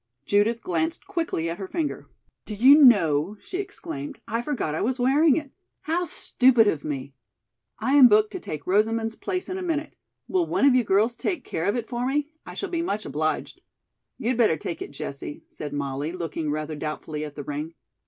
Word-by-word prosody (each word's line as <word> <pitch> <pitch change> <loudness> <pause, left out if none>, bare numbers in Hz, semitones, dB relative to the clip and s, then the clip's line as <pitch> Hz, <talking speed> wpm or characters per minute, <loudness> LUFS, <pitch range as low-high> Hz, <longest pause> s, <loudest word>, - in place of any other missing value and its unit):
Judith 215 +3 +2
glanced 165 -2 -1
quickly 330 - -2
at 170 +3 -4
her 190 - -5
finger. 310 - -3 0.4
"Do 215 - -6
you 260 +7 +8
know," 185 - +5
she 365 - -6
exclaimed, 335 -7 -6
"I 230 +1 -1
forgot 240 - -2
I 155 - -2
was 255 +3 0
wearing 275 +4 +4
it? 300 -4 -4 0.3
How 345 +3 -1
stupid 250 -8 +3
of 155 -7 0
me! 140 -2 -5 0.6
I 260 +5 0
am 280 -3 +9
booked 215 -1 +4
to - - -5
take 150 - -6
Rosamond's 225 +3 +1
place 370 -1 -3
in 370 +1 -4
a - - -5
minute. 320 -4 -2 0.3
Will 360 -3 +1
one - - +2
of 280 - +6
you 250 -1 +4
girls 215 +4 +2
take 330 - -2
care 160 - -3
of 200 - +1
it 235 -2 -3
for 245 +1 -2
me? 290 +2 -1 0.2
I - - -8
shall 390 - -4
be 335 -1 -1
much 215 - -2
obliged." 155 +3 -2 0.6
"You'd 235 +1 -1
better 215 -10 +4
take 170 - -5
it, - - -5
Jessie," 140 +1 -7
said 150 - -7
Molly, 140 +1 -3
looking 165 -3 -3
rather 155 +1 -3
doubtfully 150 0 -4
at 150 -1 -7
the 145 - -6
ring. 150 +4 -5
220 Hz, 200 wpm, -25 LUFS, -, 0.6 s, am